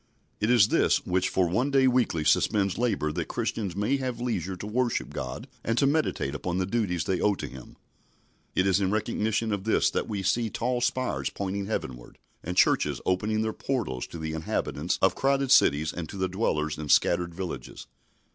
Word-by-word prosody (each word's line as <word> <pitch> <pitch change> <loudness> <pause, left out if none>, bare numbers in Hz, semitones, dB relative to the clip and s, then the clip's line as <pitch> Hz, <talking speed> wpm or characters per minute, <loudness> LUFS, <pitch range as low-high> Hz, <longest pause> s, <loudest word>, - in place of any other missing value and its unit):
It 105 - 0
is 120 -5 +5
this - - +2
which 90 +1 +1
for 95 -2 +2
one 120 +11 0
day 135 -1 +4
weekly 120 -11 +1
suspends 95 +6 +2
labour 115 -11 0
that - - -3
Christians 100 -6 -3
may 105 +8 +1
have 130 -3 -3
leisure 95 -7 -2
to 90 - -8
worship 120 +3 -1
God 65 0 -5 0.2
and 115 +1 -1
to 140 - +4
meditate 140 - 0
upon 85 +5 -3
the 95 - +1
duties 95 -6 -1
they 95 -2 -1
owe 105 -1 +3
to - - -5
Him. 65 -2 -11 0.8
It 90 - +3
is 95 +1 +3
in 95 - +1
recognition 110 +1 0
of 100 -2 -3
this 110 - +2
that - - -2
we 100 -3 -3
see 110 +4 +1
tall 120 +3 -1
spires 130 +1 -1
pointing 100 0 -4
heavenward, 65 - -5 0.3
and 90 +2 -4
churches - - +3
opening 110 +4 0
their 110 0 -2
portals 110 - -3
to - - -9
the 80 -1 -4
inhabitants 80 +1 -2
of 95 - +5
crowded 135 -1 +1
cities 75 +2 +4
and 80 -3 -6
to - - -7
the 95 -1 0
dwellers 80 -6 -1
in 75 -1 -6
scattered 85 +2 +3
villages. 95 0 -6
100 Hz, 195 wpm, -27 LUFS, 85-115 Hz, 0.8 s, is